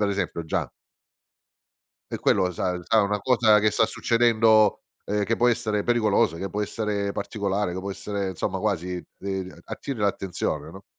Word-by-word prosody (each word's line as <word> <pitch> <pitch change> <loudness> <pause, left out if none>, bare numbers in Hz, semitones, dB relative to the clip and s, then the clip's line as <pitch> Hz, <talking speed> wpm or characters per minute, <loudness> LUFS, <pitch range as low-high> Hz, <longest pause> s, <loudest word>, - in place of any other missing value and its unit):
Ad 105 -1 +2
esempio 90 -4 -2
già - - -2 1.4
E - - -2
quello 95 - +2
lo 90 - -1
sa 90 +1 -2
sa 110 +3 +3
una 105 +1 0
cosa 110 -3 +4
che 110 +1 +3
sta 110 - +3
succedendo, 115 -3 +3 0.2
ehm, 105 0 0
che 115 - +1
può 120 - +3
essere 110 -3 0
pericolosa, 110 -8 +2
che 95 +1 -4
può 105 - -4
essere 105 -1 -2
particolare, 100 -2 -2
che 90 - -5
può 100 +1 -4
essere 100 0 -3
insomma 95 +2 -3
quasi 90 -3 -2 0.2
de 95 -3 -5
attiri 135 -5 -6
l'attenzione, 90 -6 -2
no, 95 +3 -12
100 Hz, 170 wpm, -25 LUFS, 95-110 Hz, 1.4 s, cosa